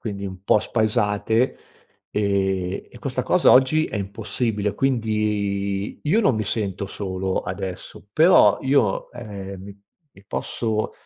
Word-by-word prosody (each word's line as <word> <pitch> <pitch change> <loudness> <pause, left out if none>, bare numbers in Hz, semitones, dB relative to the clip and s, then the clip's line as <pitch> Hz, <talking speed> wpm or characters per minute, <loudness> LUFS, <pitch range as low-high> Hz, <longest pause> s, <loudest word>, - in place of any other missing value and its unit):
quindi 100 -3 -5
un 95 -1 -8
po’ 105 - +4
spaesate, 110 +1 +1 0.5
e 95 -2 -1
e - - -13
questa - - -2
cosa - - +4
oggi 135 +5 +5
è - - -5
impossibile. 105 +1 -2
Quindi 105 -5 -1
io 190 +10 +2
non 195 - +3
mi 110 - -1
sento 100 -2 -2
solo 95 -1 -3
adesso, 95 +1 -6
però 170 +7 +6
io, 130 -7 +1
ehm, 100 -5 -8
mi 100 0 -12 0.3
mi 95 -5 -20
posso 110 -1 -2
105 Hz, 130 wpm, -23 LUFS, 100-115 Hz, 0.5 s, però